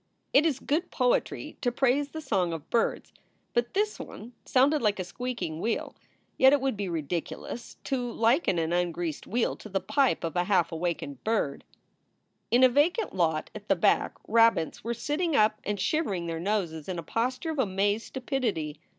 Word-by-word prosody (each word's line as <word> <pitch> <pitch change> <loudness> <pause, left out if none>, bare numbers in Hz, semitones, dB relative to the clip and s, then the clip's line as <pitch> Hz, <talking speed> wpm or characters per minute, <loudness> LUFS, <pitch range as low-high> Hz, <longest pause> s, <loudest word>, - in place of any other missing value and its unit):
It 300 +4 +6
is 290 -5 0
good 320 +6 -1
poetry 260 +4 0
to 245 - +1
praise 270 +3 +2
the 315 +2 -6
song 180 - 0
of 160 -3 -7
birds. 230 - 0 0.4
But 240 +6 0
this 420 +1 0
one 235 +3 -9
sounded 280 +4 +3
like 210 -2 +2
a 185 - -2
squeak 245 +7 -5
ing 155 0 -4
wheel. 225 0 -2 0.4
Yet 265 +1 +7
it 290 - +4
would 270 -3 0
be 200 -2 -3
ridiculous 170 +8 -4
to 250 -3 -2
liken 230 - +2
an 165 0 0
ungreased 175 -3 -2
wheel 235 +3 0
to 215 - -11
the 195 -1 0
pipe 265 +7 +1
of 165 -2 -3
a 175 0 +2
half 180 -4 +2
awakened 160 -5 -3
bird. 215 -11 0 0.9
In 245 +2 +4
a - - +10
vacant 340 - +2
lot 160 -4 0
at 210 -1 -10
the 195 - +4
back, 175 - +2
rabbits 225 -7 +3
were 235 +2 -2
sitting 295 +7 -1
up 215 -2 +3
and 205 -1 -2
shivering 205 - 0
their 165 -1 -3
noses 175 -4 -2
in 180 - -3
a 170 - -4
posture 255 - -1
of 310 - -4
amazed 205 -1 +1
stupidity. 230 - -2
220 Hz, 185 wpm, -28 LUFS, 175-265 Hz, 0.9 s, a